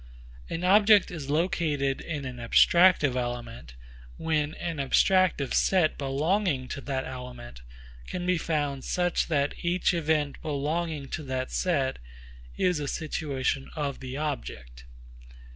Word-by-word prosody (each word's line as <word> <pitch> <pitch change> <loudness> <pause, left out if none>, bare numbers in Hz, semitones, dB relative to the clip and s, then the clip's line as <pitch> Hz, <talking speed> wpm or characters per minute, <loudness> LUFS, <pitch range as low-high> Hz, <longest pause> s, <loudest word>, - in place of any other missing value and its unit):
An 165 - -4
object 205 +2 +5
is 150 -6 -6
located 150 -4 0
in 150 -4 -5
an 125 -1 -6
abstractive 150 +4 +4
element, 120 - -5 0.4
when 155 -1 -1
an 170 -2 -4
abstractive 145 +1 +2
set 180 -5 +3
belonging 145 +1 0
to 140 - -5
that 135 -1 -3
element 125 - -9 0.5
can 180 -1 -4
be 180 -1 +2
found 145 -5 -2
such 175 -1 0
that 145 -3 +1
each 175 +1 +1
event 155 -3 0
belonging 150 0 -2
to - - -4
that 130 -1 -3
set 140 -7 0 0.6
is 180 -4 +1
a 145 - -3
situation 140 -4 -2
of 145 -3 -3
the 130 0 -6
object. - - -5
145 Hz, 125 wpm, -27 LUFS, 130-170 Hz, 0.6 s, object